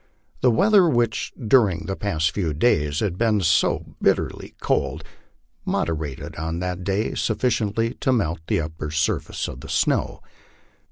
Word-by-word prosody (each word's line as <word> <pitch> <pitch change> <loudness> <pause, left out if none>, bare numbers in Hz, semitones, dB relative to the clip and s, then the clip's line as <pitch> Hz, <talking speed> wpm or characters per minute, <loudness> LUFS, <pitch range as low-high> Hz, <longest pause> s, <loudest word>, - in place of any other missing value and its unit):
The - - +5
weather, 195 - +5
which 120 -5 0
during 110 -6 +2
the 95 - -3
past 85 -6 0
few 85 -5 -2
days 75 -6 +1
had 95 -5 -2
been 110 -3 +2
so 85 -3 +1
bitterly - - 0
cold, - - -1 0.6
moderated 75 -5 -3
on 80 +1 -3
that 90 0 -3
day 100 +3 -1
sufficiently 115 -1 0
to 130 - +1
melt 90 -10 0
the - - +1
upper 75 -1 -5
surface 80 +2 -1
of 60 - -8
the - - -10
snow. - - 0
95 Hz, 145 wpm, -23 LUFS, 80-115 Hz, 0.6 s, The